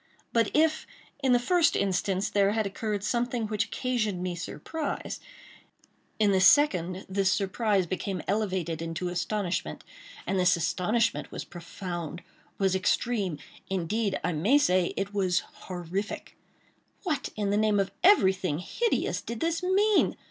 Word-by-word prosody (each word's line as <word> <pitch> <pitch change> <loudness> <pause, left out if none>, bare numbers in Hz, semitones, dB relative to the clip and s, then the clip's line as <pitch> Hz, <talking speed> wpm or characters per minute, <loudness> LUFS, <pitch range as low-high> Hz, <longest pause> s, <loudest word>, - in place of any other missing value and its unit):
But 230 -2 +3
if, 315 +1 +2 0.3
in 265 -2 +2
the 245 - +6
first 335 +7 +3
instance, 195 0 0
there 200 0 +2
had 220 -1 0
occurred 205 0 -3
something 240 0 0
which 210 -1 0
occasioned 215 -8 -2
me 180 -1 -2
surprise, 295 - -5 1.0
in 210 -2 +3
the 190 -1 +3
second, 185 - +4
this 190 0 +1
surprise 200 0 +1
became 185 0 -3
elevated 185 -6 -1
into 165 +2 -3
astonishment; 180 +1 -2 0.4
and 195 - 0
this 180 -1 +4
astonishment 200 +7 0
was - - -6
profound—was 175 +1 -5
extreme—indeed 195 0 -1
I - - +1
may 200 - +3
say 185 -11 +2
it 200 +1 -2
was 185 -3 +1 0.2
horrific. 185 +3 -5 0.7
What, 300 -8 -1
in 205 -2 -1
the - - +2
name 210 -1 +3
of 195 0 0
everything 190 - +4
hideous, 455 - -1
did 235 -1 -6
this 330 +1 0
mean? 395 +3 +3
200 Hz, 135 wpm, -28 LUFS, 180-230 Hz, 1.0 s, the